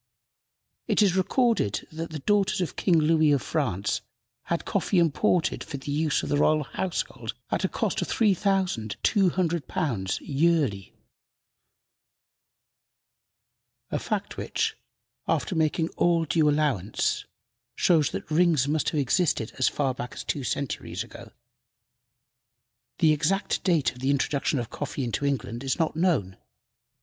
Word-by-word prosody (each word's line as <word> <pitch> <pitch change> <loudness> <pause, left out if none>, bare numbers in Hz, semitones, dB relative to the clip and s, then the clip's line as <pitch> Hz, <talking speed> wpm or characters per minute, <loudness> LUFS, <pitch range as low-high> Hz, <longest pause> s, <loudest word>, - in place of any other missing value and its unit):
It - - +3
is 190 -3 +3
recorded 205 - +1
that 165 +1 -5
the 155 - -5
daughters 195 +6 +1
of 180 - -2
King 175 -4 +3
Louis 155 -1 +4
of 140 -4 +2
France 110 - -1 0.4
had - - -2
coffee 195 - 0
imported 170 +1 +2
for 140 - -6
the 135 +2 -6
use 150 0 +1
of - - -4
the 145 - +2
royal 155 +1 +3
household 180 +5 -4 0.2
at - - 0
a - - +3
cost - - -1
of - - -2
£3,200 175 - 0
yearly, 140 - 0 3.0
a - - 0
fact - - -3
which, - - -1 0.5
after - - 0
making 160 +1 +1
all 170 -1 +2
due 150 0 +3
allowance, 140 -10 0 0.5
shows 160 -5 +3
that - - -6
"rings" 160 -4 +3
must 150 +1 +1
have 155 - -1
existed 140 - +1
as 130 - +4
far 135 -3 0
back 125 -1 -7
as - - -6
two 140 - -2
centuries 140 +1 -3
ago. - - -12 1.7
The 160 -3 +4
exact 165 +7 0
date 165 -7 +2
of 125 - -15
the 130 +2 -1
introduction 140 +2 +1
of 120 -3 -4
coffee 140 - -4
into 125 +4 -1
England 120 -3 -2
is 135 - -1
not 160 -3 0
known. 155 - +1
155 Hz, 135 wpm, -26 LUFS, 135-170 Hz, 3.0 s, Louis